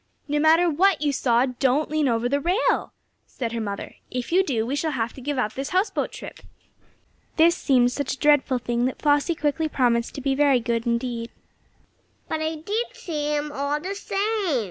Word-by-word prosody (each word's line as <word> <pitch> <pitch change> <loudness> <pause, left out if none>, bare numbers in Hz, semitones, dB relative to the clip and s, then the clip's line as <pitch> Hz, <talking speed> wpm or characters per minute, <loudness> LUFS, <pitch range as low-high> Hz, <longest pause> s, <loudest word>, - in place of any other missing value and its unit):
"No 295 0 0
matter 320 +3 +5
what 345 +2 +2
you 290 -1 +1
saw 245 -2 +2
don't 265 +3 0
lean 310 -2 +1
over 235 -1 +1
the 280 +3 +1
rail!" 360 - +1 0.4
said 235 -3 -4
her 230 -1 -3
mother. 200 -2 -5
"If 250 +2 -4
you 375 +3 +4
do, 235 -10 -1
we 265 +4 -2
shall 310 +1 -1
have 235 -3 -2
to 265 - -11
give 285 +2 -3
up 215 -4 -1
this 270 +1 -4
houseboat 375 +4 0
trip." - - -9 1.0
This 335 +1 +5
seemed 250 -7 +3
such 280 +1 -2
a - - -6
dreadful 290 -3 +3
thing, 240 0 -1
that 255 - -2
Flossie 290 +3 +2
quickly 305 +1 -1
promised 240 -4 +1
to 275 - -5
be 270 0 +1
very 280 -2 +3
careful 235 0 -1
indeed. 235 -1 -3 1.0
"But 315 - -2
I 315 +1 -1
did 415 +10 -2
see 300 -3 -3
him, 295 0 -2
all 285 +1 -1
the 370 +6 -4
same!" 400 - -1
285 Hz, 195 wpm, -24 LUFS, 245-315 Hz, 1.0 s, matter